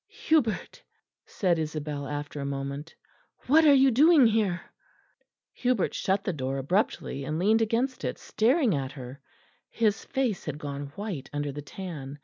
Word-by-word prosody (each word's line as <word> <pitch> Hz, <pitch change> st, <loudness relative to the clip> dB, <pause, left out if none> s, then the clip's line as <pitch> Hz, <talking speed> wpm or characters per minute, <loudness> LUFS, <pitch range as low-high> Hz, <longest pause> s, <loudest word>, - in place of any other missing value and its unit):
"Hubert," 295 Hz, -9 st, +1 dB, 0.5 s
said 175 Hz, -4 st, 0 dB
Isabel 150 Hz, -2 st, -4 dB
after 145 Hz, 0 st, -5 dB
a -, -, -3 dB
moment, 140 Hz, +3 st, -5 dB, 0.5 s
"what 315 Hz, +5 st, +5 dB
are 290 Hz, -, +8 dB
you 265 Hz, 0 st, +5 dB
doing 295 Hz, +3 st, +6 dB
here?" 210 Hz, -5 st, +2 dB, 0.9 s
Hubert 245 Hz, -6 st, 0 dB
shut 195 Hz, +1 st, 0 dB
the 190 Hz, -, -1 dB
door 135 Hz, -2 st, -3 dB
abruptly 140 Hz, -2 st, -1 dB
and 155 Hz, +3 st, -3 dB
leaned 215 Hz, +6 st, +3 dB
against 235 Hz, +4 st, 0 dB
it, -, -, -2 dB
staring 245 Hz, -, +2 dB
at 135 Hz, -2 st, -3 dB
her; 130 Hz, 0 st, -9 dB, 0.5 s
his 220 Hz, -2 st, 0 dB
face 255 Hz, -, -2 dB
had 150 Hz, -2 st, -4 dB
gone 145 Hz, -1 st, -5 dB
white 195 Hz, -10 st, -5 dB
under 145 Hz, 0 st, -2 dB
the 145 Hz, +2 st, -6 dB
tan. 145 Hz, -4 st, -7 dB
175 Hz, 150 wpm, -27 LUFS, 145-225 Hz, 0.9 s, are